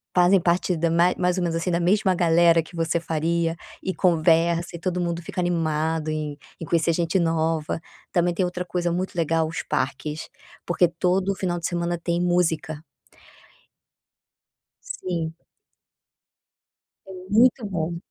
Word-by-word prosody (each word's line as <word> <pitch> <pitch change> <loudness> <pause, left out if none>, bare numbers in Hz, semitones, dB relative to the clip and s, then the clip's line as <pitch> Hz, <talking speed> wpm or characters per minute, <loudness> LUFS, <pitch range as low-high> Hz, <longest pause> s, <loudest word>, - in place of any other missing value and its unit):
fazem 180 +1 +5
parte 175 +1 +1
da 165 +1 0
ma 170 +2 +3
mais 180 0 0
ou 180 - 0
menos 165 -1 -1
assim, 165 +2 -1
da 170 0 +1
mesma 190 +1 +2
galera 170 -1 +4
que 170 - -14
você 165 0 0
faria 165 +1 -1 0.3
e 190 - -2
conversa, 170 0 +2
e - - -7
todo 180 +1 -2
mundo 170 -1 -2
fica 175 - -6
animado 160 -2 0
em 155 -1 -3 0.2
em 165 - -5
conhecer 170 +1 +2
gente 170 +2 +1
nova, 165 -1 0 0.3
também 175 0 +2
tem 185 - 0
outra 180 0 -3
coisa 175 0 -1
muito 185 +2 -2
legal, 165 -1 +1
os 165 - -4
parques, 140 +3 -3 0.4
porque 175 0 +3
todo 185 +3 0
final 175 -2 -2
de 165 - -2
semana 175 0 -2
tem 170 0 0
música. 170 -3 0 2.1
Sim. 170 - -3 1.7
É - - -8 0.2
muito 240 +2 +4
bom. 170 -3 -3
170 Hz, 150 wpm, -24 LUFS, 165-180 Hz, 2.1 s, fazem